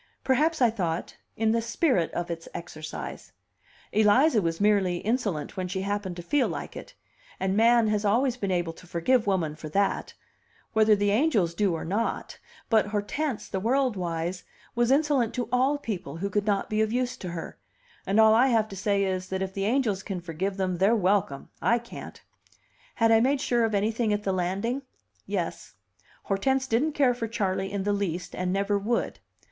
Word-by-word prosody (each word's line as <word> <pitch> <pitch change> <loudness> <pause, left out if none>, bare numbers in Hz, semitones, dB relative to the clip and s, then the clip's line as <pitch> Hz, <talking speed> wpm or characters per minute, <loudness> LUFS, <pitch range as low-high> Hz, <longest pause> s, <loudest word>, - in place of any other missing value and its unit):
Perhaps 295 +3 +2
I 235 - +5
thought, 175 -6 -3 0.2
in 220 0 +2
the 230 +1 +1
spirit 235 - +1
of 175 0 -3
its 165 0 -6
exercise; 155 -2 -7 0.6
Eliza 220 +4 +4
was 165 -2 -2
merely 200 -4 +3
insolent 205 - -2
when 185 -1 -3
she 190 +1 -3
happened 200 -2 -2
to 175 - -7
feel 285 +8 +2
like - - -6
it; - - -10 0.4
and 190 +1 0
man 230 +1 +5
has 210 0 0
always 240 +5 +2
been 200 -6 -3
able 175 -3 0
to 180 - -16
forgive 215 +8 +1
woman 170 -6 0
for 155 0 -8
that 200 +5 0 0.6
whether 220 -1 +5
the 205 0 +1
angels 215 - +2
do 195 -2 +1
or 160 - -5
not, 205 +7 -2 0.3
but 220 -4 +3
Hortense, 215 +6 -2
the 190 - -3
world 250 +3 +1
wise, 175 0 -3 0.3
was 240 0 +1
insolent 275 -5 +2
to 245 -3 -2
all 260 +4 +2
people 185 - -5
who 200 +3 -3
could 205 +2 0
not 200 -2 +1
be 215 0 0
of 220 0 +1
use 250 +1 -1
to 180 - -6
her; 170 -1 -7 0.5
and 200 +3 +2
all 220 0 +7
I 240 +4 +5
have 225 -4 +2
to 195 - -8
say 200 +1 +1
is, 185 -1 -2
that 190 0 -2
if 190 0 -5
the 195 0 -2
angels 220 -4 +1
can 190 -2 -4
forgive 180 +3 -3
them, 185 -2 -1
they're 195 +6 +4
welcome; 185 -8 0
I 235 - +3
can't! 235 0 -9 0.8
Had 225 -1 +3
I 225 - +6
made 270 +4 +2
sure 240 -3 +2
of 220 -2 -1
anything 220 +2 +1
at 205 0 0
the 195 - 0
landing? 195 +9 -1 0.5
Yes; - - -4 0.5
Hortense 265 +7 0
didn't 270 +5 +1
care 270 -4 +3
for 235 -2 -4
Charley 195 -4 -2
in 200 -1 -2
the 205 +1 +1
least, 180 -3 -3
and 180 0 -2
never 200 +1 +1
would. 230 +4 -1
205 Hz, 190 wpm, -27 LUFS, 185-235 Hz, 0.8 s, all